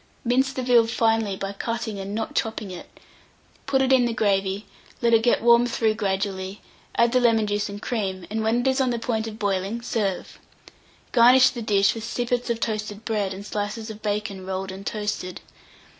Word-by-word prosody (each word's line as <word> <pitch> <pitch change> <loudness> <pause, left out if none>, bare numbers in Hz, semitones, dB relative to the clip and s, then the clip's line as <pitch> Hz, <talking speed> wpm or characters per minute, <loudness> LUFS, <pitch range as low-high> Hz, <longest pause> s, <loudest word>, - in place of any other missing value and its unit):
Mince 260 +3 +2
the 260 -1 -4
veal 240 -2 +5
finely 225 -3 +1
by 195 +1 -4
cutting, 220 0 -4
and 195 +1 -5
not 225 - -3
chopping 220 -3 -2
it; 180 - -9 0.8
put 265 -1 +2
it 265 0 +3
in 255 -2 +5
the 235 -1 -1
gravy; 200 -2 0 0.3
let 235 -2 +2
it 225 - +6
get 235 -1 +2
warmed 235 +1 +5
through 225 -2 +1
gradually; 195 -1 -2 0.4
add 235 0 +3
the 255 - +4
lemon 230 -3 +3
juice 205 0 -1
and 200 0 -7
cream, 195 -6 -3
and, 220 +1 -1
when 225 +2 +1
it 255 - -1
is 265 0 +2
on 260 - +2
the 240 - -1
point 225 -1 -2
of 215 -1 -7
boiling, 200 +1 -1
serve. 205 -6 -2 0.7
Garnish 255 +2 +7
the 240 - -6
dish 200 -3 +3
with 225 - -7
sippets 245 +1 -2
of 235 -1 0
toasted 215 -1 -3
bread 210 -4 -1
and 195 +1 -7
slices 210 +2 -4
of 215 0 -11
bacon 205 -2 -3
rolled 190 0 -4
and 195 +2 -8
toasted. 205 -4 -3
220 Hz, 195 wpm, -24 LUFS, 200-235 Hz, 0.8 s, Garnish